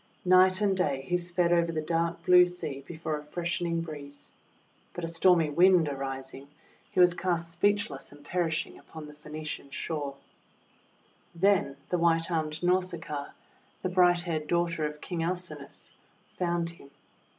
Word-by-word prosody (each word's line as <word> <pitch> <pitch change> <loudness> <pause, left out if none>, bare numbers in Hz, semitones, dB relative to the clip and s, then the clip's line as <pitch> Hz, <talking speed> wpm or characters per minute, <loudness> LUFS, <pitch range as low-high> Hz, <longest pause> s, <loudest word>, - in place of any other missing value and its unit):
Night 185 +2 +5
and 200 -2 +2
day 145 -8 0
he 180 - +1
sped 175 0 +1
over 170 -1 +3
the 160 - -2
dark 165 +2 -1
blue 180 0 +8
sea 150 -6 -5
before 160 -2 -4
a - - -11
freshening 170 +1 -2
breeze. 145 -3 -8 0.6
But 175 - -6
a - - -1
stormy 165 -1 +4
Wind 175 0 +5
arising, 135 -1 -5 0.4
he - - -2
was 180 -1 +7
cast 170 -2 -1
speechless 185 -5 0
and 145 0 -16
perishing 165 -2 -2
upon 160 -1 -10
the 150 - -11
Phaeacian 150 -1 -7
shore. 145 -1 -4 1.2
Then 180 -6 +2
the 180 - 0
white 165 0 +2
armed 155 -1 -2
Nausicaa, 170 -5 -1 0.5
the 185 - 0
bright 180 -1 +4
haired 160 -3 -3
daughter 170 -2 0
of 150 0 -9
King 175 -3 -4
Alcinous, 170 -4 -5 0.4
found 170 -1 -1
him. 155 -5 -16
170 Hz, 150 wpm, -29 LUFS, 150-180 Hz, 1.2 s, blue